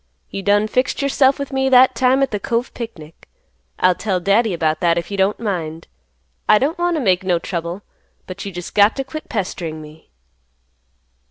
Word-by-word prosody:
You 195 - -4
done 205 +2 +2
fixed 255 +5 0
yourself 275 -1 +3
with 280 -1 -6
me 265 0 +1
that 255 0 +6
time 255 +3 +3
at 270 - -1
the 210 - -2
Cove 235 +4 -2
picnic. 165 -10 -9 0.5
I'll 185 0 +4
tell 190 0 -2
Daddy 200 +5 +2
about 160 -3 0
that 170 -1 +2
if 170 - -4
you - - -2
don't 195 +2 +1
mind. 165 -7 -4 0.6
I - - +7
don't 295 +9 -1
want 350 0 +1
to - - -1
make 190 -5 +2
no 180 -2 +1
trouble, 170 +2 -5 0.4
but 185 +1 -8
you 200 - -5
just 175 -1 -8
got 205 +1 +4
to 270 - -2
quit 310 +3 -8
pestering 175 -6 -4
me." 155 +1 -14
205 Hz, 190 wpm, -19 LUFS, 175-255 Hz, 0.6 s, I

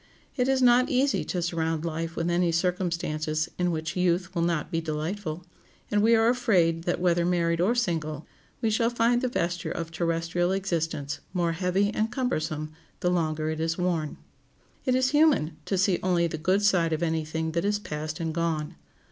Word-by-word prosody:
It 250 -2 +1
is 265 -1 +2
not 250 +2 +5
easy 275 0 +2
to 180 -2 -2
surround 165 -1 -1
life 165 0 -3
with 165 - -1
any 175 0 +2
circumstances 165 -3 -1
in 180 0 +2
which 160 -2 -3
youth 180 0 +1
will 170 - -1
not 170 -3 0
be 165 - 0
delightful; 160 +2 -4 0.5
and 205 0 +3
we 230 +2 +5
are 225 0 +4
afraid 180 -10 +2
that, 175 - 0
whether 175 -1 +2
married 170 -1 +1
or 215 +7 +2
single, 160 - -1 0.4
we 220 - +2
shall 230 +2 +2
find 240 0 +2
the 255 - +1
vesture 175 -7 -2
of 165 -1 -4
terrestrial 170 +1 0
existence 165 -7 -2 0.2
more 170 -2 +1
heavy 185 +4 0
and 220 +2 0
cumbersome 155 - -2 0.3
the 180 - +2
longer 155 -3 0
it 160 - -4
is 165 +1 -1
worn. 170 -4 -1 0.7
It 255 -2 +2
is 255 0 +2
human 290 - +3
to 195 - -1
see 185 -1 +2
only 175 -2 +2
the 160 -2 -3
good 185 +5 +2
side 175 -5 +3
of 160 +2 -1
any 160 -1 0
thing 160 +1 -3
that 170 +1 -1
is 205 +1 +1
past 155 -4 -5
and 165 -1 -2
gone. 165 -2 -1
170 Hz, 190 wpm, -27 LUFS, 160-200 Hz, 0.7 s, not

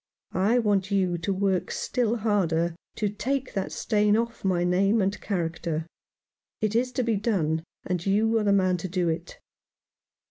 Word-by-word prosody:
I 205 +6 +3
want 205 -4 +1
you 185 -4 +1
to 170 +4 -2
work 190 -1 0
still 240 -3 0
harder 175 -7 +1 0.2
to 210 - 0
take 260 +6 -2
that 195 - -2
stain 210 -1 +2
off 235 0 -3
my 180 -2 +1
name 195 +5 +3
and 195 +1 0
character. 165 -4 -2 0.7
It 215 0 0
is 250 +2 +2
to 255 0 0
be 225 -3 +1
done, 165 -7 0 0.2
and 180 -2 -2
you 220 +4 +2
are - - 0
the 205 - +3
man 185 -2 +3
to 175 - -4
do 180 -1 0
it." 165 +2 -4
195 Hz, 170 wpm, -26 LUFS, 180-215 Hz, 0.7 s, I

